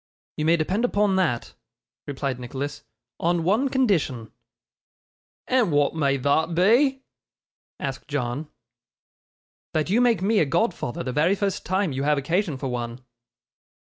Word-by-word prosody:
'You 155 - -1
may 165 +1 +4
depend 185 +8 0
upon 205 -4 +2
that,' 155 -11 0 0.5
replied 135 -2 -3
Nicholas; 140 +4 -5 0.4
'on 170 0 +1
one 220 +10 +2
condition.' 175 - 0 1.2
'And 250 -8 +2
wa'at 145 -1 +2
may 140 -4 +1
thot 160 +5 +1
be?' 260 - +3 0.8
asked 135 -1 -5
John. 140 +1 -3 1.3
'That 155 +3 0
you 230 +4 +4
make 230 -7 +3
me 210 +2 +3
a - - +4
godfather 155 - -1
the 130 - -3
very 160 +8 +2
first 200 -1 -2
time 185 -2 +1
you 135 0 -3
have 150 +1 +2
occasion 165 +2 0
for 135 - -6
one. 120 0 -4
160 Hz, 135 wpm, -24 LUFS, 140-200 Hz, 1.3 s, may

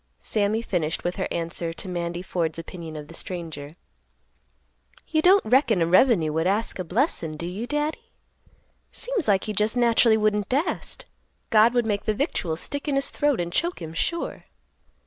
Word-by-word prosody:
Sammy 215 +1 0
finished 165 -7 -2
with 175 +1 -2
her - - -1
answer 170 0 -2
to 190 - -8
Mandy 175 -1 -3
Ford's 165 -4 -2
opinion 165 -1 -8
of 150 -1 -7
the 165 - -12
stranger; 165 -4 -6 1.3
"You 315 -1 +1
don't 380 +4 +5
reckon 235 -3 +3
a 165 - +3
revenue 175 - +4
would 160 +2 +1
ask 205 +1 0
a - - -1
blessin', 175 - 0
do 170 - -5
you, 195 +7 -4
Daddy? 295 +2 -2 0.8
Seems 480 - -2
like 195 -3 +3
he 215 - -3
just 210 +4 0
naturally 235 -2 +4
wouldn't 210 -2 +1
dast; 285 +7 0 0.5
God 225 +2 +5
would 240 -1 +3
make 205 -2 -1
the 215 - +1
victuals 175 - -2
stick 285 +1 -3
in 285 - +1
his 275 0 0
throat 290 -3 +1
and 175 0 -3
choke 345 +3 0
him 160 -2 -7
sure." 335 - -2
205 Hz, 175 wpm, -25 LUFS, 170-245 Hz, 1.3 s, don't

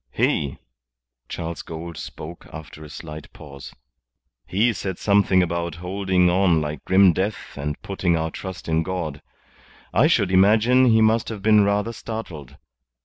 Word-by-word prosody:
"He" 70 - 0 0.7
Charles 85 -1 -5
Gould 85 +1 -8
spoke 80 +3 -9
after 80 -1 -10
a 75 - -11
slight 75 +1 -9
pause 70 -3 -11 0.8
"he 115 +5 +2
said 95 -3 -4
something 100 -2 +3
about 85 -1 -3
holding 90 +1 0
on 90 -2 +3
like 75 -1 -4
grim 95 -1 +5
death 100 +4 -3
and 75 +1 -4
putting 90 -3 0
our 80 0 -2
trust 95 +1 -8
in 80 0 +1
God. 80 -4 -4 0.7
I 125 +9 +4
should 105 - +2
imagine 110 +7 +5
he 110 -2 +4
must 110 +1 +2
have 105 -4 -7
been 105 -1 +5
rather 105 +3 0
startled. 95 - -8
95 Hz, 145 wpm, -23 LUFS, 80-100 Hz, 0.8 s, grim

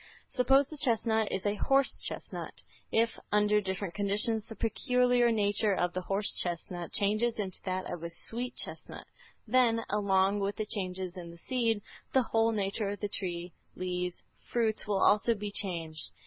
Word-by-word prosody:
Suppose 270 +2 +4
the 305 0 -9
chestnut 225 -5 +2
is 190 - -2
a 205 - +2
horse 270 +5 +2
chestnut. - - -6 0.4
If, 230 +1 +2
under 210 0 +4
different 190 -2 -3
conditions, 210 +2 0
the 225 - -8
peculiar 245 +1 +2
nature 205 -1 +2
of 175 -1 0
the 185 - -2
horse 195 +3 -1
chestnut 175 0 -4
changes 215 +3 +1
into 195 -4 -2
that 185 0 -2
of 175 -2 -5
a 170 - -4
sweet 235 +8 -3
chestnut, - - -6 0.4
then, 240 -3 +3
along 200 -1 +3
with 200 0 -1
the 215 - -2
changes 185 -3 -3
in 170 -2 -7
the 170 - -11
seed, 225 0 0 0.3
the 265 - +5
whole 225 0 +2
nature 200 0 -1
of 205 - -4
the 205 - -2
tree, 175 -3 -3 0.2
leaves, 180 -1 -3 0.3
fruits 220 -3 +1
will 200 -2 +2
also 220 +3 +4
be 205 0 -5
changed. 165 -6 -2
205 Hz, 165 wpm, -31 LUFS, 185-230 Hz, 0.4 s, the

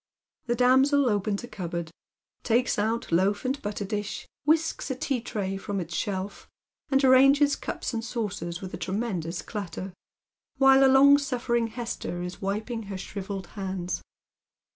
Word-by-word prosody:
The 240 - +1
damsel 265 +3 +4
opens 205 -1 0
a - - -6
cupboard, 170 -5 -5 0.5
takes 240 -1 +1
out 220 0 -1
loaf 195 +7 +2
and 270 +2 -1
butter 205 0 -3
disli, 205 0 -4 0.2
whisks 315 0 +1
a 265 - -1
tea 260 -1 -1
tray 195 -5 -3
from 200 0 -3
its 175 -1 -5
shelf, 195 0 -3 0.4
and 270 0 +3
arranges 275 +2 +6
cups - - -4
and 225 -1 -2
saucers 200 -7 -4
with 185 -1 -7
a - - -3
tremendous 185 -4 -3
clatter, 195 -3 -6 0.6
while 270 0 +6
the 270 - +7
longsuifering 265 -4 +4
Hester 225 -6 -4
is 180 0 -7
wiping 215 +4 -2
her 195 - -4
shrivelled 195 0 -5
hands. 190 -3 -3
215 Hz, 145 wpm, -27 LUFS, 190-255 Hz, 0.6 s, the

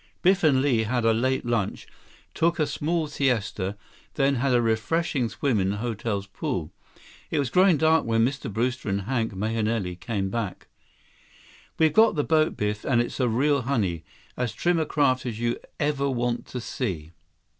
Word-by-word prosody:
Biff 190 +1 +4
and 135 -4 +4
Li 125 -6 +2
had 120 +1 0
a 115 - +5
late 130 +4 0
lunch, 115 -4 -1 0.5
took 170 +1 +1
a 155 - +2
small 160 +3 -1
siesta, 110 -8 -1 0.4
then 140 -1 +2
had 135 +2 +1
a 125 - +4
refreshing 120 +3 0
swim 130 -4 0
in 95 0 +1
the 100 - -2
hotel's 105 -3 -3
pool. 90 -4 -4 0.6
It 160 - -1
was 140 -4 0
growing 185 0 +5
dark 160 +1 +3
when 115 0 +2
Mr. 130 -2 -3
Brewster 120 +2 -1
and 100 +1 0
Hank 115 +1 -1
Mahenili 110 -2 -1
came 95 +1 -3
back. 110 -5 -4 1.1
"We've 160 -2 +3
got 220 +3 +5
the 145 - +1
boat, 155 0 +2
Biff. 105 0 -2
And 120 -3 +2
it's 120 - -2
a 125 -2 +2
real 140 +5 +2
honey. 105 - -1 0.3
As 125 -3 -2
trim 175 -1 +1
a 155 - -1
craft 130 -4 +1
as 115 -2 -4
you'd 120 0 -1 0.2
ever 145 -2 0
want 120 -2 -1
to 125 - -5
see." 90 - -4
120 Hz, 175 wpm, -25 LUFS, 110-145 Hz, 1.1 s, a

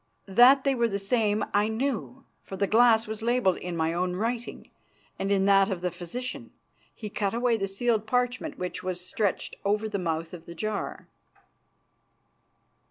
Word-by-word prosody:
That 245 +7 +6
they 275 - +2
were 235 -2 +2
the 200 -3 -2
same 210 +1 +1
I 205 +1 +3
knew, 250 +2 -3 0.2
for 190 - -8
the 200 - +2
glass 225 +1 +5
was 220 0 -5
labelled 235 -5 +2
in 175 -1 -5
my 160 0 0
own 180 +1 -1
writing 230 +4 -4 0.5
and 195 - -1
in 195 -1 +3
that 195 0 +5
of 190 -3 -3
the 180 0 -1
physician. 185 +9 -6 0.5
He 215 - -7
cut 205 0 -2
away 240 0 +2
the 195 -3 -2
sealed 220 +2 0
parchment 245 +1 -1
which 180 0 -4
was 180 -1 -4
stretched 205 -3 -2
over 210 +2 0
the 205 -2 -3
mouth 165 -1 -3
of 170 -2 -10
the 170 - -9
jar. 215 +4 -4
210 Hz, 170 wpm, -27 LUFS, 185-235 Hz, 0.5 s, That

